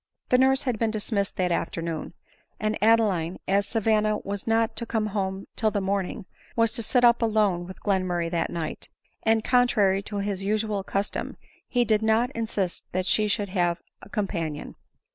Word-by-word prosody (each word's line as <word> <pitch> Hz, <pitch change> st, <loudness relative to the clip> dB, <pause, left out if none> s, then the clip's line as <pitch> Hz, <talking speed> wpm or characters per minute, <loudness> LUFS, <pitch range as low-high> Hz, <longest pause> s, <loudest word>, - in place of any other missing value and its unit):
The 250 Hz, -, +5 dB
nurse 265 Hz, +1 st, +4 dB
had 245 Hz, -5 st, -1 dB
been 225 Hz, -, +2 dB
dismissed 210 Hz, -2 st, -2 dB
that 180 Hz, -1 st, 0 dB
afternoon; 165 Hz, -1 st, -3 dB, 0.4 s
and 215 Hz, 0 st, 0 dB
Adeline, 205 Hz, -6 st, +3 dB
as 200 Hz, +1 st, +2 dB
Savanna 215 Hz, -1 st, +2 dB
was 200 Hz, +1 st, -4 dB
not 225 Hz, 0 st, +2 dB
to 235 Hz, -, -1 dB
come 220 Hz, -2 st, 0 dB
home 190 Hz, -1 st, -2 dB
till 220 Hz, -, +2 dB
the 210 Hz, -, -1 dB
morning, 195 Hz, +1 st, -2 dB, 0.3 s
was 230 Hz, -1 st, +3 dB
to -, -, -3 dB
sit 245 Hz, +3 st, +2 dB
up 235 Hz, 0 st, +6 dB
alone 210 Hz, -6 st, +2 dB
with 185 Hz, -, -11 dB
Glenmurray 180 Hz, -4 st, 0 dB
that 170 Hz, -, 0 dB
night; 165 Hz, -2 st, -5 dB, 0.3 s
and, 225 Hz, 0 st, +2 dB
contrary 215 Hz, -7 st, +3 dB
to 205 Hz, +1 st, -6 dB
his 200 Hz, -1 st, -2 dB
usual 210 Hz, 0 st, 0 dB
custom, 195 Hz, +1 st, -3 dB, 0.3 s
he 245 Hz, -1 st, +2 dB
did 215 Hz, -1 st, +2 dB
not 220 Hz, +3 st, +2 dB
insist 215 Hz, -7 st, -2 dB
that 185 Hz, 0 st, 0 dB
she 210 Hz, +2 st, +2 dB
should 205 Hz, -1 st, -1 dB
have 175 Hz, -2 st, +1 dB, 0.2 s
a -, -, -13 dB
companion. 170 Hz, -8 st, -3 dB
205 Hz, 175 wpm, -26 LUFS, 190-225 Hz, 0.4 s, up